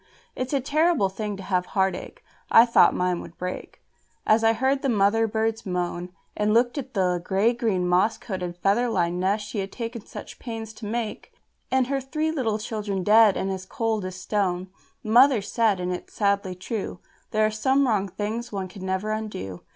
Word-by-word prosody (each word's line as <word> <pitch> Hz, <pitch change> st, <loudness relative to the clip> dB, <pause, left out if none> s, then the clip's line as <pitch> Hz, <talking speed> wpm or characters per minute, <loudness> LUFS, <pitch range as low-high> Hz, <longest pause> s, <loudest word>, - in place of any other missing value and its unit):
It's 255 Hz, 0 st, -3 dB
a 280 Hz, -, +2 dB
terrible 305 Hz, -, +2 dB
thing 205 Hz, +1 st, -4 dB
to 195 Hz, -, -8 dB
have 180 Hz, -2 st, 0 dB
heart 190 Hz, -1 st, +3 dB
ache, -, -, -10 dB, 0.3 s
I 230 Hz, -, +8 dB
thought 235 Hz, -, +5 dB
mine 180 Hz, -1 st, 0 dB
would 170 Hz, -, -12 dB
break 180 Hz, 0 st, -6 dB, 0.4 s
As 220 Hz, +1 st, +4 dB
I 225 Hz, -, +6 dB
heard 265 Hz, +4 st, +1 dB
the 275 Hz, -, 0 dB
mother 225 Hz, +1 st, +3 dB
bird's 225 Hz, +1 st, -1 dB
moan, 180 Hz, -1 st, -3 dB, 0.3 s
And 210 Hz, +1 st, +1 dB
looked 240 Hz, +4 st, +2 dB
at 265 Hz, -2 st, -8 dB
the 180 Hz, -2 st, +1 dB
grey 200 Hz, +6 st, +2 dB
green, 215 Hz, -7 st, 0 dB
moss 185 Hz, +5 st, +3 dB
coated, 180 Hz, -5 st, -5 dB
feather 205 Hz, +7 st, +2 dB
lined 175 Hz, -4 st, 0 dB
nest 200 Hz, +3 st, 0 dB
she 210 Hz, -, -4 dB
had 195 Hz, 0 st, -4 dB
taken 230 Hz, -2 st, -5 dB
such -, -, -10 dB
pains 225 Hz, -2 st, -6 dB
to 215 Hz, -1 st, -8 dB
make, 225 Hz, 0 st, -4 dB, 0.4 s
And 260 Hz, 0 st, +2 dB
her 270 Hz, +1 st, -1 dB
three 305 Hz, +4 st, -1 dB
little 240 Hz, -9 st, 0 dB
children 210 Hz, -3 st, -3 dB
dead, 215 Hz, 0 st, +6 dB
and 195 Hz, -, -1 dB
as 190 Hz, -1 st, -4 dB
cold 220 Hz, +1 st, -2 dB
as 185 Hz, 0 st, -5 dB
stone. 185 Hz, -2 st, -1 dB, 0.3 s
Mother 245 Hz, +3 st, +5 dB
said, 210 Hz, -1 st, +1 dB
and 180 Hz, 0 st, -2 dB
it's 180 Hz, -, -8 dB
sadly 200 Hz, -3 st, 0 dB
true, 195 Hz, +2 st, -4 dB, 0.3 s
"There 215 Hz, 0 st, +2 dB
are 215 Hz, -, +1 dB
some 265 Hz, +5 st, +2 dB
wrong 205 Hz, -4 st, +1 dB
things 215 Hz, +5 st, -4 dB
one 195 Hz, -2 st, -4 dB
can 190 Hz, 0 st, -10 dB
never 190 Hz, +3 st, -1 dB
undo." 210 Hz, -, -5 dB
210 Hz, 195 wpm, -25 LUFS, 190-230 Hz, 0.4 s, I